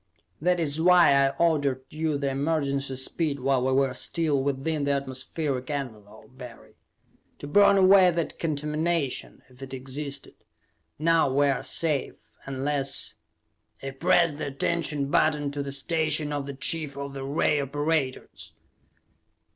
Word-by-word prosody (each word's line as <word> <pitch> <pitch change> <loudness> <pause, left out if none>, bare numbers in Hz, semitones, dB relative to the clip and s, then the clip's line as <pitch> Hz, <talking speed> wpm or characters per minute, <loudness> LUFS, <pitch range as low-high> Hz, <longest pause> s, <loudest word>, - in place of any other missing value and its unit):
That 180 +2 +2
is 155 -1 0
why 175 -4 +6
I 140 0 +4
ordered 145 -6 +1
the 155 -3 -1
emergency 140 -1 -1
speed 140 +2 -2
while 130 -1 +1
we 130 - +1
were 135 -1 +2
still 150 +1 -1
within 140 +3 -2
the 140 - +1
atmospheric 130 0 -3
envelope, 120 -4 -7
Barry. 125 -3 -12 0.6
To - - -9
burn 200 +6 +5
away 190 -1 +6
that 170 -2 -3
contamination, 155 -1 -2
if 130 +1 -19
it 135 0 -7
existed. 140 +2 -6 0.6
Now 165 -2 +2
we 140 +2 +3
are 135 - 0
safe, 155 -4 -1 0.3
unless 135 0 -1 0.4
" - - -32
I 135 - -4
pressed 155 +3 +2
the 155 - -4
attention 145 0 -2
button 150 -2 +2
to 145 0 -4
the 140 0 -5
station 150 +1 0
of 140 -1 -3
the 140 - -6
chief 150 0 0
of 140 0 -6
the 135 -1 -6
ray 145 +1 +1
operators. 145 -1 -3
140 Hz, 140 wpm, -26 LUFS, 135-160 Hz, 0.6 s, why